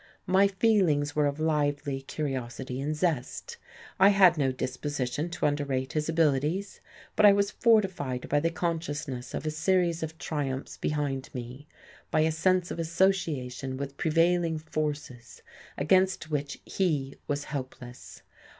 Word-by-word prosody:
my 190 Hz, +2 st, +4 dB
feelings 190 Hz, -9 st, +2 dB
were 150 Hz, -1 st, +3 dB
of 140 Hz, +1 st, -3 dB
lively 145 Hz, -3 st, 0 dB
curiosity 130 Hz, -2 st, -4 dB
and 150 Hz, +2 st, -2 dB
zest. 170 Hz, -, -2 dB, 0.4 s
I 195 Hz, +1 st, +8 dB
had 190 Hz, -3 st, +6 dB
no 135 Hz, -4 st, +1 dB
disposition 130 Hz, +3 st, -3 dB
to 175 Hz, -, -2 dB
underrate 140 Hz, -3 st, -1 dB
his 155 Hz, 0 st, -1 dB
abilities, 160 Hz, +4 st, 0 dB, 0.3 s
but 215 Hz, -, +2 dB
I 205 Hz, -1 st, +9 dB
was 200 Hz, 0 st, +1 dB
fortified 190 Hz, -, +1 dB
by 145 Hz, -, +2 dB
the 165 Hz, +3 st, +1 dB
consciousness 155 Hz, -7 st, -3 dB
of -, -, -4 dB
a 155 Hz, -, 0 dB
series 170 Hz, +1 st, +1 dB
of 160 Hz, 0 st, -5 dB
triumphs 140 Hz, -4 st, -3 dB
behind 145 Hz, -3 st, -2 dB
me, 125 Hz, +4 st, -7 dB, 0.4 s
by 155 Hz, -, +2 dB
a 160 Hz, +1 st, +3 dB
sense 180 Hz, +2 st, +1 dB
of -, -, -5 dB
association 160 Hz, -7 st, 0 dB
with 140 Hz, 0 st, -6 dB
prevailing 165 Hz, +1 st, +2 dB
forces 150 Hz, -6 st, -5 dB, 0.3 s
against 185 Hz, +1 st, +2 dB
which 145 Hz, -1 st, -2 dB
he 150 Hz, -8 st, -1 dB
was 145 Hz, -1 st, -1 dB
helpless. 130 Hz, -4 st, -8 dB
150 Hz, 140 wpm, -28 LUFS, 135-170 Hz, 0.4 s, I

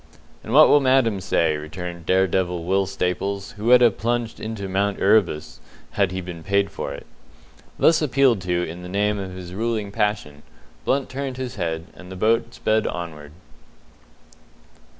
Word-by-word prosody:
"And 110 Hz, -, -7 dB
what 155 Hz, +5 st, +8 dB
will 145 Hz, -, +6 dB
Madam 130 Hz, -7 st, +2 dB
say?" 80 Hz, -4 st, +1 dB
returned 85 Hz, +2 st, -7 dB
dare 95 Hz, +1 st, +4 dB
devil 90 Hz, -2 st, -1 dB
Will 95 Hz, +2 st, +1 dB
Staples 95 Hz, +1 st, -2 dB
who 105 Hz, 0 st, -8 dB
would 125 Hz, +1 st, +6 dB
have 120 Hz, -4 st, +4 dB
plunged 120 Hz, 0 st, -2 dB
into 110 Hz, -3 st, -5 dB
Mount 100 Hz, +1 st, -1 dB
Erebus 95 Hz, -7 st, +2 dB, 0.3 s
had 100 Hz, -3 st, +1 dB
he 95 Hz, 0 st, -3 dB
been 85 Hz, -2 st, -8 dB
paid 100 Hz, +3 st, 0 dB
for -, -, -5 dB
it. -, -, -8 dB, 0.7 s
Thus 160 Hz, -1 st, +4 dB
appealed 135 Hz, -7 st, +3 dB
to 90 Hz, -1 st, -1 dB
in 85 Hz, +1 st, -6 dB
the 90 Hz, -, -8 dB
name 105 Hz, +2 st, 0 dB
of 95 Hz, -1 st, -6 dB
his 90 Hz, -1 st, -9 dB
ruling 110 Hz, -1 st, -2 dB
passion, 100 Hz, -9 st, -2 dB, 0.4 s
Blunt 135 Hz, 0 st, +1 dB
turned 135 Hz, -1 st, -5 dB
his 130 Hz, -2 st, -4 dB
head, 80 Hz, -3 st, -3 dB
and 90 Hz, 0 st, -12 dB
the -, -, -7 dB
boat 115 Hz, +4 st, +1 dB
sped 110 Hz, 0 st, +1 dB
onward. 80 Hz, -4 st, -6 dB
100 Hz, 170 wpm, -23 LUFS, 90-115 Hz, 0.7 s, what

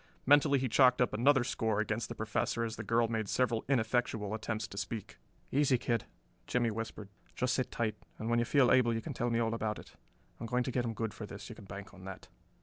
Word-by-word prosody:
Mentally 145 Hz, 0 st, +6 dB
he 130 Hz, 0 st, 0 dB
chalked 125 Hz, +1 st, +5 dB
up 125 Hz, -, +2 dB
another 130 Hz, +3 st, +4 dB
score 110 Hz, -3 st, 0 dB
against 110 Hz, +1 st, -1 dB
the -, -, -5 dB
Professor 110 Hz, +1 st, -1 dB
as 115 Hz, -1 st, -3 dB
the -, -, -6 dB
girl 115 Hz, +2 st, +2 dB
made 110 Hz, -3 st, -2 dB
several 120 Hz, -3 st, +1 dB
ineffectual 115 Hz, -4 st, +1 dB
attempts 110 Hz, 0 st, -3 dB
to -, -, -10 dB
speak. 100 Hz, +1 st, -5 dB, 0.3 s
"Easy, 135 Hz, -2 st, +3 dB
kid," 115 Hz, -2 st, -1 dB, 0.4 s
Jimmie 120 Hz, -2 st, +1 dB
whispered. 110 Hz, -2 st, -5 dB, 0.3 s
"Just 125 Hz, 0 st, +1 dB
sit 130 Hz, -, 0 dB
tight, 110 Hz, -2 st, -1 dB, 0.2 s
and 110 Hz, -, -5 dB
when 120 Hz, 0 st, +2 dB
you 120 Hz, -, +2 dB
feel 130 Hz, 0 st, +4 dB
able 120 Hz, -3 st, +4 dB
you 115 Hz, -, -2 dB
can -, -, -5 dB
tell 120 Hz, -, -1 dB
me 115 Hz, -, +1 dB
all 115 Hz, -1 st, +1 dB
about 110 Hz, -2 st, -2 dB
it. -, -, -13 dB, 0.4 s
I'm 115 Hz, -, -5 dB
going 125 Hz, +2 st, +1 dB
to 130 Hz, -, -3 dB
get 125 Hz, -1 st, 0 dB
him 115 Hz, -1 st, -3 dB
good 110 Hz, -1 st, -2 dB
for 105 Hz, -, -7 dB
this, 100 Hz, -, -9 dB
you 115 Hz, -, -8 dB
can 105 Hz, -, -12 dB
bank 100 Hz, +1 st, -9 dB
on 95 Hz, -1 st, -12 dB
that." 95 Hz, -1 st, -9 dB
115 Hz, 240 wpm, -32 LUFS, 110-125 Hz, 0.4 s, Mentally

